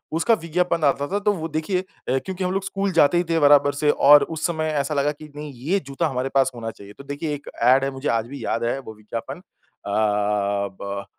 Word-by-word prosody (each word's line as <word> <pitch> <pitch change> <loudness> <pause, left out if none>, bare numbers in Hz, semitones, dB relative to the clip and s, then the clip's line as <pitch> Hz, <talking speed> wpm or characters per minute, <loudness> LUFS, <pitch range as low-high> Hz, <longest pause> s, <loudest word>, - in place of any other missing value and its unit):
उसका 170 +8 +3
विज्ञापन 170 0 0
आता 140 0 +2
था 200 - -1
तो 205 0 +2
वो 165 -4 -4
देखिए 170 +5 -1 0.3
क्योंकि 185 +8 -2
हम 180 - 0
लोग 195 0 -1
स्कूल 195 0 -2
जाते 165 +1 +4
ही 175 - +2
थे 165 - +2
बराबर 145 -1 +5
से 150 +1 0
और 145 +1 +7
उस 155 - -3
समय 160 -2 -2 0.2
ऐसा 140 +2 -3
लगा 145 +1 +1
कि 150 +1 -11
नहीं 150 0 -7 0.2
ये 195 +2 +3
जूता 140 +3 -1
हमारे 130 -2 -2
पास 135 -1 +3
होना 115 -1 -5
चाहिए। 100 -1 -14
तो - - -10
देखिए 145 +2 -4
एक 145 - -10
ऐड 130 +3 +5
है 135 - 0
मुझे 135 +2 -5
आज 115 0 0
भी 135 -2 -8
याद 115 - -1
है 120 +3 0
वो 110 -4 -9
विज्ञापन 115 +6 -6 0.5
अ, 100 - -4 0.9
ब 100 0 -5
145 Hz, 230 wpm, -23 LUFS, 130-165 Hz, 0.9 s, और